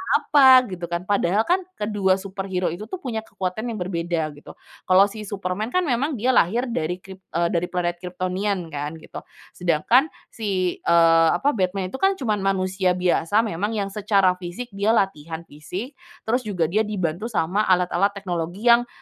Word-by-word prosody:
apa, 260 -3 +6
gitu, 175 -1 -5
kan. 170 +1 -3
Padahal, 200 +1 +1
kan, 360 +9 +2 0.2
kedua 205 -3 +1
superhero 190 -2 -3
itu, 210 +6 -7
tuh, - - -5
punya 230 -4 -2
kekuatan 220 +1 -4
yang 230 - -3
berbeda 170 -4 -2
gitu. 145 0 -13 0.3
Kalau 195 +2 +5
si 215 -1 -8
Superman, 195 +1 -3
kan, 365 - +3
memang 280 +1 0
dia 250 +3 +1
lahir 230 +3 +3
dari 180 0 -3
krip 190 -1 -11 0.2
eee, 170 0 +1
dari 175 0 0
planet 175 -1 -2
Kryptonian, 185 0 -3
kan, 145 +2 -4
gitu. 160 - -9 0.3
Sedangkan 180 - +2 0.2
si, 190 -5 -2
eee, 165 -1 +5
apa 285 - +1
Batman 185 -4 -2
itu, 265 - -6
kan, 390 0 +3
cuma 220 - -1
manusia 190 -1 0
biasa 180 +3 +2
memang 210 +1 -2
yang 200 -2 -2
secara 195 -3 +2
fisik 190 +7 -7
dia 205 +3 +1
latihan 165 -4 -2
fisik, 170 - -7 0.3
terus 235 +3 +1
juga 180 -5 -1
dia 215 +1 +1
dibantu 185 0 -2
sama 205 -1 0
alat-alat 180 +2 +2
teknologi 180 0 -4
yang 240 +1 +4
190 Hz, 170 wpm, -23 LUFS, 175-215 Hz, 0.3 s, apa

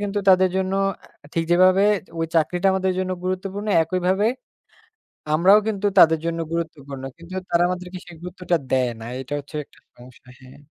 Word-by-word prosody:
কিন্তু 205 0 -2
তাদের 185 0 +6
জন্য 190 0 -1 0.6
ঠিক 165 0 0
যেভাবে, 185 +2 +5 0.4
ঐ - - -2
চাকরিটা 175 +4 +1
আমাদের 190 0 0
জন্য 185 0 -2
গুরুত্বপূর্ণ, 190 +3 -3 0.2
একইভাবে 185 +4 0 1.1
আমরাও 190 +6 +6
কিন্তু 205 -1 -1
তাদের 160 -1 +7
জন্য 170 0 -2
গুরুত্বপূর্ণ। 145 -5 -5 0.2
কিন্তু 170 +2 -11 0.2
তারা 170 0 +3
আমাদেরকে 180 0 -5
সেই 175 -2 -12
গুরুত্বটা 180 -1 -2
দেয় 130 -2 +2
না। 115 - -8 0.2
এটা 135 +2 -9
হচ্ছে 145 +2 -10
একটা - - -25 0.2
সমস্যা। 125 +1 -17
হ্যাঁ। 130 +2 -15
180 Hz, 155 wpm, -22 LUFS, 160-190 Hz, 1.1 s, তাদের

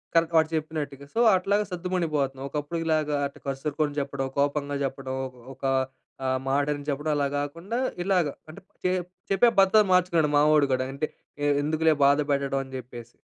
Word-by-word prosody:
కానీ 165 0 +5
వాడు 160 0 +4
చెప్పినట్టుగా 150 -3 -4
సో - - +1 0.2
అట్లాగా 200 +3 +1
సద్దుమణిగిపోతున్నాం. 155 -7 -1
ఒకప్పుడుకి 165 +3 -3
లాగా 150 -1 +1
అటు 140 - -7
కసురుకొని 145 +2 -2
జెప్పడం 140 -1 -2
కోపంగా 145 0 0
జెప్పడం 130 0 -4
ఒక 125 -2 -16
ఒక 135 - -7 0.6
ఆహ్, 130 0 +1
మాటని 145 +1 0
చెప్పడం 145 +2 -1
అలా 140 - +1
గాకుండా 165 +10 -3 0.3
ఇలాగ 185 -3 +2 0.2
అంటే 180 +6 -11 0.2
చె 180 - +3 0.4
చెప్పే 235 +5 +5
పద్ధతి 205 +2 +5
మార్చుకున్నాడు 170 -4 +3
మావోడు 150 0 +5
గూడా 130 0 0
అంటే 155 +2 -1 0.4
ఎ - - +3 0.2
ఎందుకులే 155 +1 +2
బాధ 140 +1 +5
పెట్టడం 140 -1 0
అని 130 - -14
జెప్పేసి. 120 -2 -10
150 Hz, 160 wpm, -26 LUFS, 140-165 Hz, 0.6 s, కానీ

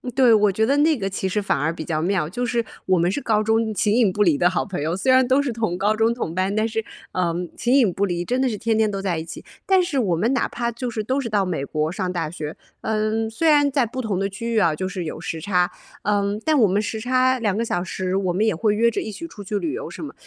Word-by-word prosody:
对， 255 -2 +5
我 210 -2 +4
觉 215 +3 0
得 275 +5 +2
那 310 +2 +4
个 195 -7 -3
其 190 0 -2
实 210 +3 -1
反 200 - 0
而 160 +3 0
比 160 - -6
较 155 -2 -2
妙， 175 -3 0
就 245 +7 -2
是， 235 -1 0 0.2
我 185 -1 +3
们 175 +2 +2
是 200 - -2
高 220 -6 +1
中 220 0 +1
形 205 +1 +2
影 225 -6 +3
不 210 - -1
离 170 -8 +4
的 175 - +4
好 180 - 0
朋 185 -7 -5
友， 160 +3 -1
虽 225 +8 +1
然 260 -1 +5
都 260 +2 +4
是 280 -3 -2
同 220 -6 -2
高 205 +3 +1
中 225 +1 +2
同 170 -9 -4
班， 190 +2 0
但 215 +1 +1
是 225 0 -3 0.3
呃 175 -2 0 0.2
形 240 +2 +1
影 240 -9 +4
不 195 +3 0
离， 175 -2 -2
真 250 +7 -1
的 265 - +2
是 220 -4 -2
天 225 +1 0
天 220 -1 +2
都 195 -1 -3
在 185 -4 -1
一 160 - -4
起。 170 - -9 0.2
但 380 -1 +4
是 340 -5 -2
我 200 -9 +2
们 215 +9 +1
哪 265 - +1
怕 235 0 -3
就 245 +2 -4
是 220 -2 -3
都 260 +6 0
是 265 - -3
到 205 -2 +2
美 170 -7 -2
国 155 +2 -1
上 185 -1 -3
大 165 -3 -2
学， 155 -2 -6 0.3
呃， 220 +1 0
虽 315 +9 +1
然 290 -1 +5
在 265 -3 +2
不 255 +4 -6
同 215 -7 -1
的 195 0 0
区 230 +4 -4
域 225 - +3
啊， 165 -6 +3
就 185 +5 -3
是 190 -1 -4
有 155 - -5
时 160 - -5
差， 180 0 +1 0.3
呃， 205 0 +1
但 310 -1 +3
我 220 - +6
们 195 +2 +1
时 215 +1 -3
差 255 +2 +2
2 210 -4 0
个 230 - 0
小 175 -5 -1
时 185 0 -3
我 190 -2 0
们 210 +5 +1
也 215 - +1
会 210 +5 +1
约 235 +2 +3
着 - - -2
一 220 - -5
起 335 +11 -7
出 205 - -10
去 205 +2 -2
旅 310 +9 -2
游 465 +5 -5
什 - - -8
么。 - - -9
210 Hz, 315 characters per minute, -22 LUFS, 185-235 Hz, 0.3 s, 我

